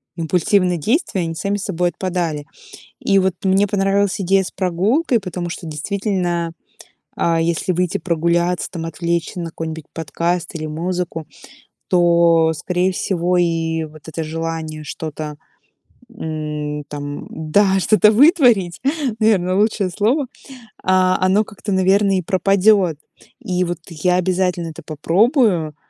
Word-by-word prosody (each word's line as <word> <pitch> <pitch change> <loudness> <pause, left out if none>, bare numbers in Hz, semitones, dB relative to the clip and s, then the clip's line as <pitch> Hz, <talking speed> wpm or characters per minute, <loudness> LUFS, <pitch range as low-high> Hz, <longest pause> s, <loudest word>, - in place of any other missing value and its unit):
импульсивные 180 +2 +1
действия, 220 - 0
они 165 -1 -3
сами 200 +4 -1
собой 180 -3 -1
отпадали. 175 -5 -3 0.5
И 195 - +2
вот 190 -1 +1
мне 195 +1 +3
понравилась 195 0 +1
идея 195 +1 +3
с - - -7
прогулкой, 205 - +1
потому 180 -3 -5
что 170 - -7
действительно, 175 +1 -2 0.6
а, 165 -1 +1
если 170 +2 0
выйти 180 0 0
прогуляться 170 +1 0
там, 165 -3 -5
отвлечься 170 +1 -2
на 170 - -3
какой-нибудь 160 -1 -6
подкаст 170 +3 -2
или 155 -1 -4
музыку, 170 +1 -3 0.6
то, 170 -2 +4
скорее 180 +4 0
всего, 180 -1 0
и 165 -2 0
вот 155 0 -13
это 160 +1 -4
желание 160 -1 -4
что-то, 150 0 -6 0.8
м, 150 -4 -4
там 145 0 -6
да, 190 +5 +2
что-то 215 +2 +5
вытворить, 240 - +4 0.4
наверное, 185 -4 +3
лучшее 205 -1 +1
слово, 235 - +1 0.6
а, 185 0 +3
оно 195 +3 +3
как-то, 205 -1 -7
наверное, 195 +1 +3
и - - -2
пропадёт. 190 -1 +3 0.5
И 180 -1 -1
вот 175 -1 -4
я 175 +2 0
обязательно 180 -1 0
это 160 +1 -10
попробую, 175 - +2
175 Hz, 125 wpm, -19 LUFS, 165-195 Hz, 0.8 s, что-то